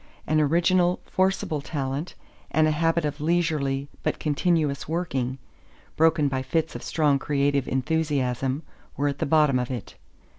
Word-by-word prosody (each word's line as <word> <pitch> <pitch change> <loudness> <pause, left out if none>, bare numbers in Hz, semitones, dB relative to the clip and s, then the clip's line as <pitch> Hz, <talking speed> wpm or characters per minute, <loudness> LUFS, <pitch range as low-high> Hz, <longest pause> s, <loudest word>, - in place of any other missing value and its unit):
An 155 0 +2
original, 175 +4 +3
forcible 185 -5 0
talent 140 +2 -4 0.3
and 155 0 +3
a - - +2
habit 165 +1 +1
of 145 0 -3
leisurely 150 -4 0
but - - -1
continuous 150 -2 0
working, 135 -7 -2 0.6
broken 160 -2 +3
by 135 -1 -1
fits 160 +5 -1
of - - -5
strong 150 -3 +1
creative 140 -1 +1
enthusiasm, 135 -1 0 0.3
were 145 +1 +1
at 140 - -5
the - - 0
bottom 150 -3 +4
of 125 - -2
it. 125 -6 -5
150 Hz, 145 wpm, -25 LUFS, 135-160 Hz, 0.6 s, bottom